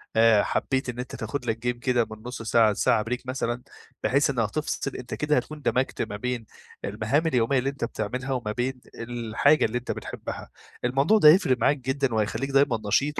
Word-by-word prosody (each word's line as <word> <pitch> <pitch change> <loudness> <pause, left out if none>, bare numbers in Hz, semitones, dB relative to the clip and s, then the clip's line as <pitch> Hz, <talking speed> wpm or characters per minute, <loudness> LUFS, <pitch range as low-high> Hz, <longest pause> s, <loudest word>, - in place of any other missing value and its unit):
آآ 110 -2 +5
حبّيت 130 -1 -1
إن 125 0 -5
أنت 125 - -5
تاخد 120 +4 -4
لك 115 -1 -1
جيم 120 0 -2
كده 125 -2 +1
من 110 - -7
نص 125 0 -6
ساعة 115 -1 +4
لساعة 110 +2 +2
بريك 125 +3 -4
مثلًا 125 -2 -2 0.4
بحيث 140 +2 +3
إنّها 120 -5 +1
تفصِل، 135 +1 -3
أنت 125 -1 -7
كده 150 0 +1
هتكون 150 +4 -4
دمجت 130 -1 0
ما 105 - -3
بين 125 0 -3 0.4
المهام 110 +10 0
اليوميّة 130 -2 +2
اللي 135 - 0
أنت 140 -3 -6
بتعملها 125 +5 -4
وما 120 -5 -2
بين 125 +3 -3
الحاجة 120 +5 +1
اللي 115 +2 -1
أنت 125 - -4
بتحبها، - - -6 0.4
الموضوع 135 - +3
ده 155 -8 +8
هيفرق 150 -6 +5
معاك 140 +5 +2
جدًا، 130 0 -1
وهيخليك 110 +5 -1
دايمًا 135 -3 +3
نشيط 140 +8 +1
125 Hz, 190 wpm, -26 LUFS, 115-135 Hz, 0.4 s, ده